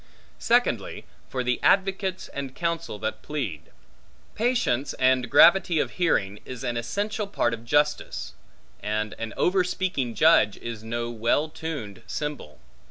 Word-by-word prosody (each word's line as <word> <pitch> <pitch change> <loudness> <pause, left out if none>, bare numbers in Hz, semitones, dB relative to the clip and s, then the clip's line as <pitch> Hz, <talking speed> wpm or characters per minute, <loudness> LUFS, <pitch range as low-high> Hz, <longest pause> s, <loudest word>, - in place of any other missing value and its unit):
Secondly, - - +1 0.2
for 130 -1 -2
the 125 0 0
advocates 190 -1 +1
and 135 -2 -6
counsel 170 -9 -2
that 110 +1 -4
plead. 105 - -5 0.6
Patience 215 - 0
and 130 -2 +2
gravity 175 +3 +6
of - - 0
hearing, 105 - 0
is 130 0 -8
an 120 -2 -2
essential 205 - -2
part 120 -11 0
of 115 0 -6
justice; 145 +4 0 0.5
and 105 0 -2
an 115 -1 -4
overspeaking 180 -9 0
judge 155 -10 +5
is 115 -2 -7
no 120 +1 -3
well 120 +7 +1
tuned 145 - -6
cymbal. 150 - -5
130 Hz, 130 wpm, -26 LUFS, 115-170 Hz, 0.6 s, gravity